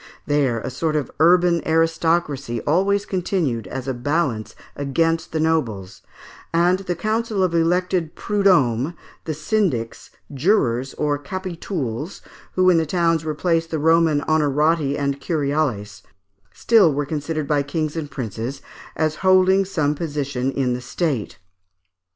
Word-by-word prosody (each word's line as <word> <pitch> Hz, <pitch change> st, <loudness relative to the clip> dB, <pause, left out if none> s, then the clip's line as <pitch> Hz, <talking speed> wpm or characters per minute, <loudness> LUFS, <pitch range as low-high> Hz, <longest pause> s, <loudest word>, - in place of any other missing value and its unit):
There, 140 Hz, -5 st, +1 dB
a -, -, -5 dB
sort 155 Hz, +4 st, -1 dB
of 150 Hz, -3 st, -2 dB
urban 175 Hz, +1 st, +4 dB
aristocracy 160 Hz, -6 st, 0 dB
always 195 Hz, +6 st, +1 dB
continued, 170 Hz, -, -1 dB
as 130 Hz, +6 st, -6 dB
a 135 Hz, -, -1 dB
balance 125 Hz, -3 st, -1 dB, 0.2 s
against 165 Hz, +4 st, 0 dB
the 160 Hz, -, -1 dB
nobles, 115 Hz, -13 st, -1 dB, 0.5 s
and 175 Hz, +2 st, +3 dB
the 180 Hz, -2 st, -3 dB
counsel 215 Hz, +1 st, -1 dB
of 180 Hz, -2 st, 0 dB
elected 175 Hz, 0 st, +1 dB
prud'hommes, 175 Hz, -, +2 dB, 0.3 s
the 155 Hz, -, -3 dB
syndics, 155 Hz, -, -1 dB, 0.2 s
jurors 135 Hz, -, +1 dB
or 145 Hz, -1 st, 0 dB
capitouls, 165 Hz, -, -5 dB, 0.3 s
who 185 Hz, 0 st, +3 dB
in 170 Hz, -, +4 dB
the 160 Hz, -, -1 dB
towns 165 Hz, -1 st, +1 dB
replaced 165 Hz, +1 st, 0 dB
the 160 Hz, -, -2 dB
Roman 160 Hz, -1 st, +3 dB
honorati 150 Hz, -1 st, +1 dB
and 140 Hz, -1 st, -2 dB
curiales, 140 Hz, -, -1 dB, 0.5 s
still 210 Hz, -, +4 dB
were 145 Hz, +1 st, -1 dB
considered 155 Hz, 0 st, -3 dB
by 145 Hz, -1 st, +2 dB
kings 155 Hz, +2 st, -3 dB
and 155 Hz, -3 st, -4 dB
princes 120 Hz, +1 st, -5 dB, 0.3 s
as 155 Hz, 0 st, 0 dB
holding 185 Hz, +1 st, +4 dB
some 155 Hz, -6 st, 0 dB
position 145 Hz, -4 st, -2 dB
in 130 Hz, -2 st, 0 dB
the 125 Hz, -, -4 dB
state. 135 Hz, -, -2 dB
155 Hz, 135 wpm, -21 LUFS, 140-170 Hz, 0.5 s, urban